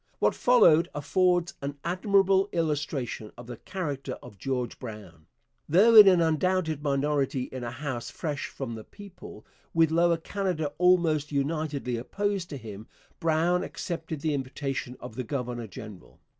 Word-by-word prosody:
What - - +2
followed 180 -9 +5
affords 175 +4 +1
an 140 +1 -4
admirable 195 +2 +2
illustration 145 -9 -2
of 120 - -10
the 120 -1 -8
character 150 -8 -4
of 105 -6 -12
George 130 -3 -3
Brown. 100 -9 -10 0.4
Though 200 +9 +6
in 210 -2 +11
an 180 -3 +6
undoubted 160 -1 +1
minority 140 -2 0
in 130 -1 -7
a 120 - -3
House 125 -1 -5
fresh 150 -5 -4
from 130 -4 -6
the 110 -1 -7
people, 195 - -12 0.3
with 165 -1 +4
Lower 170 +1 +3
Canada 170 -4 -2
almost 170 -5 +3
unitedly 140 -3 -1
opposed 195 - -2
to 145 - -5
him, 110 -3 -9 0.3
Brown 165 +2 +2
accepted 160 -3 -5
the 155 -1 0
invitation 135 -1 -4
of - - -9
the 130 +3 -4
governor 125 -3 -4
general. 90 - -11
150 Hz, 145 wpm, -27 LUFS, 125-175 Hz, 0.4 s, in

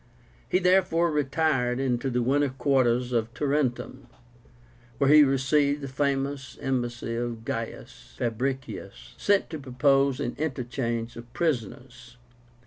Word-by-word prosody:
He - - +3
therefore 180 -2 +3
retired 135 -3 +1
into 130 -1 0
winter 140 +3 +2
quarters 125 -2 +1
at 115 +1 -1
Tarentum, 135 -3 -1 0.9
where 140 +1 +3
he 150 0 +9
received 140 +2 +2
the 140 - -5
famous 135 0 -2
embassy 120 -4 -2
of 115 -1 -4
GAIUS 115 -1 -6
FABRICIUS, 125 -3 -4
sent 200 -4 +1
to 160 - -5
propose 135 0 +2
an 125 -4 -3
interchange 120 -5 -3
of 120 +1 -11
prisoners. 125 - -3
135 Hz, 115 wpm, -26 LUFS, 120-145 Hz, 0.9 s, he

